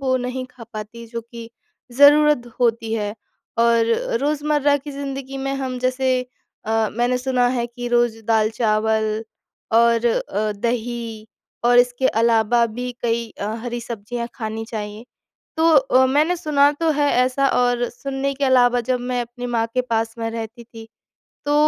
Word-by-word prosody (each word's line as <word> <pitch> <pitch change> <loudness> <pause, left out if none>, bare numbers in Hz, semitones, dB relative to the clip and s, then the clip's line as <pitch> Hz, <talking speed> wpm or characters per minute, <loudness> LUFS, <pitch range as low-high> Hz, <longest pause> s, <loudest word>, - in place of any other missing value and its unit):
वो 260 -1 +1
नहीं 250 +1 -3
खा 235 -2 -12
पाती, 220 +2 -7
जो 230 0 -5
कि 230 0 -11 0.5
ज़रूरत 300 +1 +7
द 240 -1 -14
होती 230 -2 +1
है। 210 -2 -2 0.4
और 230 -1 +4 0.3
रोजमर्रा 290 0 +1
की 290 +1 -8
ज़िंदगी 275 -1 -5
में 275 0 -2
हम 260 -2 -3
जैसे 255 0 +1 0.5
अ, 220 -1 +1
मैंने 240 +2 +1
सुना 250 -1 +1
है 245 -1 -1
कि 245 0 -7
रोज 240 -1 +2
दाल-चावल 220 0 +1 0.5
और 230 0 +4
अ, 215 -2 0
दही 230 0 -3 0.4
और 245 0 +5
इसके 245 +1 +3
अलावा 230 +1 +3
भी 245 +3 -5
कई 235 0 0
अ, 200 - -2 0.2
हरी 240 0 -4
सब्जियाँ 235 +1 -5
खानी 220 -2 -4
चाहिए, 210 0 -6 0.5
तो 325 +1 +3
अ, 260 -1 +4
मैंने 300 +7 +2
सुना 290 -4 +3
तो 330 -1 +2
है 290 -1 +1
ऐसा 260 +2 +1
और 245 -1 +1
सुनने 275 +2 -3
के 280 - -1
अलावा 245 -2 +4
जब 250 -1 +1
मैं 245 0 -2
अपनी 245 +1 -7
माँ 230 -1 +1
के 255 - +3
पास 225 0 0
में 225 0 -2
रहती 230 +1 -7
थी, 225 -1 -12 0.6
तो 290 - +2
240 Hz, 160 wpm, -21 LUFS, 225-260 Hz, 0.6 s, ज़रूरत